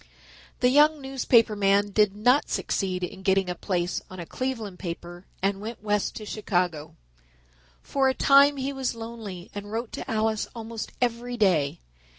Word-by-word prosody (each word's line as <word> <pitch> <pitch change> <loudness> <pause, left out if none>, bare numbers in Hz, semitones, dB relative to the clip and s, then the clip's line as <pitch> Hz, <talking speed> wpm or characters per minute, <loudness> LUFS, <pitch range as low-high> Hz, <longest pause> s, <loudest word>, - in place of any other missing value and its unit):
The 250 - +5
young 300 +3 +5
newspaper 255 -5 +2
man 200 0 +2
did 205 -1 +3
not 245 +7 +3
succeed 185 -2 -1
in 185 +2 -5
getting 190 -1 +2
a - - -1
place 175 -1 -2
on 185 - -9
a 170 - -5
Cleveland 225 -5 -4
paper 175 0 -7 0.2
and 195 0 0
went 220 0 -7
west 210 -1 0
to 215 - -7
Chicago. 175 -8 -2 0.9
For 270 -1 +1
a 260 - -1
time 280 +1 +6
he 270 +1 -2
was 265 -3 -2
lonely 225 -6 -8
and 205 0 -7
wrote 230 +1 -3
to - - -7
Alice 220 -1 0
almost 225 -1 -6
every 245 0 -1
day. 165 - +2
215 Hz, 160 wpm, -26 LUFS, 190-245 Hz, 0.9 s, time